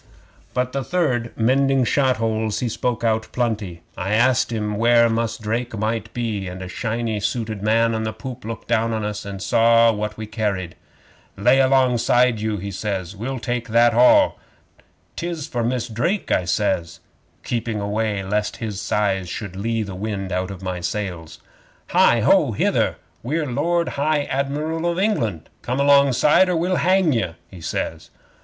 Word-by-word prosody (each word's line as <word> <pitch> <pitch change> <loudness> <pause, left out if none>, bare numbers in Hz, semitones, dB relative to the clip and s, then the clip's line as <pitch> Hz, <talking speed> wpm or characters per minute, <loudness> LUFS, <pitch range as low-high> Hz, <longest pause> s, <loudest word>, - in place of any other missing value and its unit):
But 125 0 0
the 135 0 -2
third, 130 -9 0
mending 135 +3 +3
shot 130 0 +2
holes, 110 -1 -1
he 125 - -1
spoke 120 +1 -2
out 110 -1 +1
plenty. 105 -8 -2
I 95 +2 -2
asked 125 +1 +3
him 105 -2 -2
where 115 +1 +5
Mus' 115 0 -1
Drake 115 +1 -3
might 110 +1 -2
be, 110 -5 -3
and 90 +1 -7
a - - -6
shiny 115 +2 -2
suited 110 -1 -3
man 115 +2 +2
on 110 - -1
the 110 0 -2
poop 120 +3 -8
looked 115 +1 -7
down 115 0 +1
into 110 -1 -1
us, 105 0 -6
and 100 -1 -6
saw 115 0 +5
what 105 0 -4
we 110 - -5
carried. 105 -5 -2 0.6
'"Lay 125 +7 +4
alongside 125 -3 +3
you!" 110 -1 -1
he 100 +1 -5
says. 95 -2 -4
"We'll 125 +6 -4
take 120 -1 -3
that 115 +1 +4
all." 125 - +5 0.8
'"'Tis 170 -4 -3
for 120 -1 -3
Mus' 125 0 -1
Drake," 130 - -1
I 90 - +2
says, 85 -2 -1 0.4
keeping 115 -2 -2
away 105 0 -1
lest 105 +2 -2
his 105 -4 -4
size 95 -4 0
should 100 -3 -6
lee 115 +3 -1
the 100 -2 -7
wind 95 0 -4
out 90 +1 -1
of 95 -1 -8
my 90 -1 -3
sails. 85 -3 -5 0.5
'"Hi! - - +4
Ho! - - +4
Hither! - - +1 0.3
We're 150 +6 -1
Lord 165 +6 0
High 150 +1 0
Admiral 150 +5 -2
of 170 - -4
England! 115 - 0
Come 125 +2 -2
alongside, 140 +5 +5
or 180 - +1
we'll 180 +3 +1
hang 185 -3 +3
ye," 90 -8 -1 0.2
he 90 -3 -11
says. 80 0 -4
115 Hz, 170 wpm, -22 LUFS, 105-125 Hz, 0.8 s, where